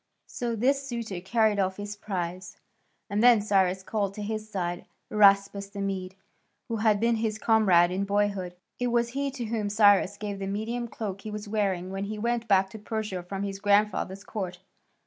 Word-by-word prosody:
So 235 Hz, -1 st, -3 dB
this 270 Hz, +5 st, +2 dB
suitor 230 Hz, -7 st, -4 dB
carried 215 Hz, +1 st, +2 dB
off 190 Hz, -1 st, 0 dB
his 205 Hz, 0 st, -5 dB
prize. 185 Hz, -3 st, -5 dB, 0.5 s
And 205 Hz, 0 st, 0 dB
then 240 Hz, -2 st, +7 dB
Cyrus 190 Hz, -2 st, +1 dB
called 200 Hz, -1 st, -2 dB
to 210 Hz, -, -5 dB
his 215 Hz, 0 st, -4 dB
side 175 Hz, -4 st, -3 dB, 0.3 s
Araspas 200 Hz, -1 st, +4 dB
the 200 Hz, -, -6 dB
Mede, 190 Hz, -1 st, -3 dB, 0.5 s
who 230 Hz, -, -2 dB
had 215 Hz, -1 st, +3 dB
been 230 Hz, +1 st, +2 dB
his 220 Hz, -1 st, -1 dB
comrade 195 Hz, -6 st, +4 dB
in 190 Hz, +2 st, -1 dB
boyhood. 200 Hz, -3 st, 0 dB, 0.2 s
It 245 Hz, -, 0 dB
was 235 Hz, 0 st, +1 dB
he 275 Hz, +3 st, -2 dB
to 260 Hz, -3 st, -5 dB
whom 215 Hz, -2 st, -2 dB
Cyrus 205 Hz, -1 st, +4 dB
gave 205 Hz, -1 st, -5 dB
the 195 Hz, -, -3 dB
Median 225 Hz, +4 st, -3 dB
cloak 200 Hz, -4 st, -5 dB
he 215 Hz, -, -7 dB
was 210 Hz, 0 st, -6 dB
wearing 195 Hz, -4 st, -1 dB
when 195 Hz, +1 st, -3 dB
he 215 Hz, +1 st, -5 dB
went 235 Hz, +1 st, -1 dB
back 195 Hz, -2 st, +3 dB
to 220 Hz, -, -9 dB
Persia 210 Hz, -3 st, -3 dB
from 195 Hz, +3 st, -5 dB
his 195 Hz, -1 st, -4 dB
grandfather's 200 Hz, -1 st, +1 dB
court. 185 Hz, -5 st, -5 dB
205 Hz, 185 wpm, -27 LUFS, 195-220 Hz, 0.5 s, then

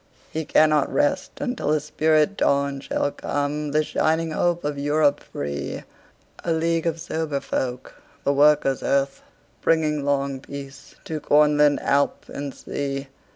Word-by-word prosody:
He 160 Hz, 0 st, -3 dB
cannot 155 Hz, -2 st, +3 dB
rest 290 Hz, -1 st, +1 dB
until 245 Hz, -, -2 dB
a 155 Hz, 0 st, +3 dB
spirit 155 Hz, +4 st, +2 dB
dawnShall 140 Hz, -2 st, 0 dB
come;—the 150 Hz, +1 st, -1 dB
shining 160 Hz, +1 st, 0 dB
hope 175 Hz, +2 st, 0 dB
of 145 Hz, -1 st, -2 dB
Europe 145 Hz, 0 st, +2 dB
free:A 70 Hz, -, -7 dB
league 165 Hz, +1 st, +1 dB
of 165 Hz, 0 st, -1 dB
sober 160 Hz, -3 st, -2 dB
folk, 125 Hz, -2 st, -3 dB, 0.3 s
the 140 Hz, -, +2 dB
Workers' 145 Hz, -2 st, +4 dB
Earth, 135 Hz, 0 st, 0 dB, 0.4 s
Bringing 155 Hz, -3 st, +2 dB
long 140 Hz, -1 st, 0 dB
peace 135 Hz, 0 st, -10 dB
to 160 Hz, -5 st, -3 dB
Cornland, 150 Hz, 0 st, +4 dB
Alp 140 Hz, 0 st, +1 dB
and 140 Hz, 0 st, -5 dB
Sea. 140 Hz, 0 st, -4 dB
150 Hz, 125 wpm, -23 LUFS, 140-155 Hz, 0.4 s, Workers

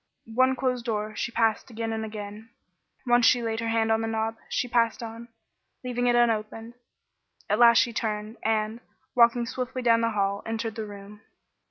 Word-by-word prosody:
One 260 Hz, +2 st, +3 dB
closed 250 Hz, -2 st, -1 dB
door 215 Hz, -2 st, -2 dB
she 240 Hz, -, -3 dB
passed 225 Hz, 0 st, +1 dB
again 225 Hz, -1 st, -4 dB
and 220 Hz, 0 st, -3 dB
again. 215 Hz, 0 st, -8 dB, 0.6 s
Once 240 Hz, -1 st, +4 dB
she 245 Hz, -1 st, +4 dB
laid 225 Hz, 0 st, -2 dB
her 230 Hz, -, -3 dB
hand 225 Hz, 0 st, +1 dB
on 220 Hz, 0 st, +2 dB
the 225 Hz, -, -2 dB
knob, 225 Hz, 0 st, -1 dB, 0.3 s
but 245 Hz, -, -10 dB
passed 230 Hz, 0 st, +1 dB
on, 230 Hz, +1 st, -8 dB, 0.6 s
leaving 245 Hz, -1 st, -1 dB
it 240 Hz, -, +4 dB
still 240 Hz, 0 st, +5 dB
unopened. 225 Hz, 0 st, -2 dB, 0.7 s
At 210 Hz, -, +1 dB
last 235 Hz, -1 st, +7 dB
she 235 Hz, -1 st, +3 dB
turned, 215 Hz, -1 st, -3 dB
and, 220 Hz, 0 st, 0 dB, 0.3 s
walking 235 Hz, 0 st, +4 dB
swiftly 255 Hz, +1 st, -4 dB
down 230 Hz, -1 st, +4 dB
the 230 Hz, -, +2 dB
long 225 Hz, -, -3 dB
hall, 200 Hz, 0 st, 0 dB
entered 225 Hz, 0 st, -3 dB
the 220 Hz, -1 st, -5 dB
room. 205 Hz, +1 st, -11 dB
225 Hz, 190 wpm, -26 LUFS, 220-240 Hz, 0.7 s, last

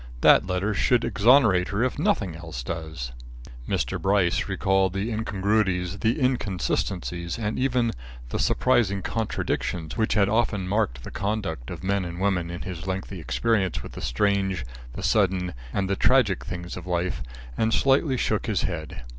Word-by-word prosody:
That -, -, +6 dB
letter 95 Hz, +3 st, 0 dB
should 125 Hz, +3 st, +2 dB
exonerate 110 Hz, -6 st, +4 dB
her 105 Hz, +4 st, 0 dB
if 130 Hz, -, -1 dB
nothing 90 Hz, -6 st, +1 dB
else 80 Hz, -7 st, -7 dB
does." 80 Hz, -5 st, -5 dB, 0.6 s
Mr. -, -, -1 dB
Gryce 95 Hz, -3 st, +2 dB
recalled 95 Hz, -1 st, +2 dB
the 100 Hz, +4 st, -2 dB
incongruities, 100 Hz, -3 st, 0 dB
the 115 Hz, +7 st, +1 dB
inconsistencies 90 Hz, -, -1 dB
and 110 Hz, -2 st, -2 dB
even 125 Hz, -3 st, +2 dB, 0.4 s
the -, -, -3 dB
surprising 105 Hz, -7 st, +2 dB
contradictions 90 Hz, -7 st, -2 dB
which 110 Hz, -, +1 dB
had 100 Hz, -2 st, +4 dB
often 105 Hz, -3 st, +1 dB
marked 95 Hz, -, 0 dB
the -, -, -8 dB
conduct 95 Hz, -, -3 dB
of 85 Hz, -1 st, -7 dB
men 100 Hz, 0 st, +1 dB
and 85 Hz, 0 st, -6 dB
women, 95 Hz, -3 st, 0 dB
in 85 Hz, 0 st, -5 dB
his 90 Hz, -1 st, -6 dB
lengthy 95 Hz, 0 st, -4 dB
experience 95 Hz, +2 st, 0 dB
with -, -, -8 dB
the -, -, -8 dB
strange, 95 Hz, +3 st, 0 dB, 0.3 s
the -, -, -6 dB
sudden, 95 Hz, -3 st, +2 dB, 0.2 s
and 95 Hz, +5 st, -1 dB
the 100 Hz, -, 0 dB
tragic 115 Hz, -5 st, +3 dB
things 85 Hz, -1 st, -5 dB
of 90 Hz, -1 st, -8 dB
life, 90 Hz, -1 st, -1 dB, 0.3 s
and 110 Hz, 0 st, +1 dB
slightly 135 Hz, +2 st, +3 dB
shook 110 Hz, -3 st, 0 dB
his 105 Hz, -4 st, 0 dB
head. 80 Hz, -8 st, -4 dB
95 Hz, 160 wpm, -25 LUFS, 90-110 Hz, 0.6 s, That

